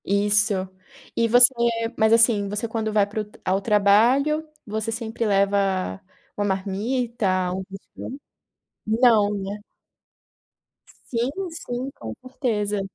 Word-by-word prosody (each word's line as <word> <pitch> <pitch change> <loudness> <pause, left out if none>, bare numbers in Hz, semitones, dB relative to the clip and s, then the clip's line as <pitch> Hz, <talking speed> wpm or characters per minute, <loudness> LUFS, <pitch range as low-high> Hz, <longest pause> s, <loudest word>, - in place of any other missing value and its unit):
Isso. 205 +1 +3 0.6
E 230 - +2
você 245 +3 +7 0.4
mas 220 0 +3
assim, 225 -3 +4
você 210 +3 -2
quando 220 -1 -3
vai 210 -1 +3
para 210 +2 -4
o - - -6
tra 210 - -21
ao 190 +2 +1
trabalho, 235 +10 +3 0.2
você 220 +1 -3
sempre 225 0 -4
leva 195 - 0 0.3
uma 205 - -1
marmita, 210 +4 -2
algo 185 0 -1
assim? 200 +7 -9 0.7
Não, 220 -2 +3
né? 200 +1 -6 1.5
Sim, 235 +1 0 0.2
sim, 260 -5 -5
com 110 -1 -6
certeza. 210 -6 -2
210 Hz, 120 wpm, -23 LUFS, 200-235 Hz, 1.5 s, você